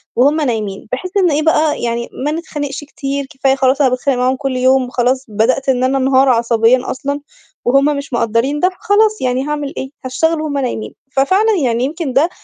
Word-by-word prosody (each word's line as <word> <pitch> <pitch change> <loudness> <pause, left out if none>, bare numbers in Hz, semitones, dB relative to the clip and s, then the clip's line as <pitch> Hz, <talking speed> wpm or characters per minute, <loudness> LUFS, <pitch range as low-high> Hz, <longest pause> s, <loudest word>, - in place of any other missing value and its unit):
وهُم 290 +5 +3
نايمين، 215 -7 -3
بحيث 360 +9 -4
إن 360 -5 +3
إيه 295 +2 +1
بقى 310 -1 +2
يعني 235 0 -2 0.2
ما 295 - +1
نتخانقش 295 -3 -5
كتير 280 -1 -4
كفاية 270 0 +1
خلاص 270 +1 +2
أنا 265 - +4
باتخانق 255 +1 0
معاهم 255 +1 +1
كلّ 270 -1 -3
يوم، 255 0 +3
وخلاص 255 +1 0
بدأت 225 +6 0
إن 255 -1 +2
أنا 260 +1 +2
انهار 265 0 +3
عصبيًا 235 +1 +2
أصلًا، 280 +2 -3 0.4
وهُم 275 +3 +3
مش 280 -2 -7
مقدّرين 235 +5 0
ده 365 - +3
فخلاص 420 +3 +1
يعني 255 +1 0
هاعمل 295 -1 -3
إيه، 265 - -4 0.2
هاشتغل 320 +5 0
وهُم 295 -2 -3
نايمين، 250 -5 -3 0.2
ففعلًا 380 +12 +2
يعني 235 -1 +1
يمكن 295 -1 -3
ده 300 +6 +3
270 Hz, 190 wpm, -16 LUFS, 250-295 Hz, 0.4 s, أنا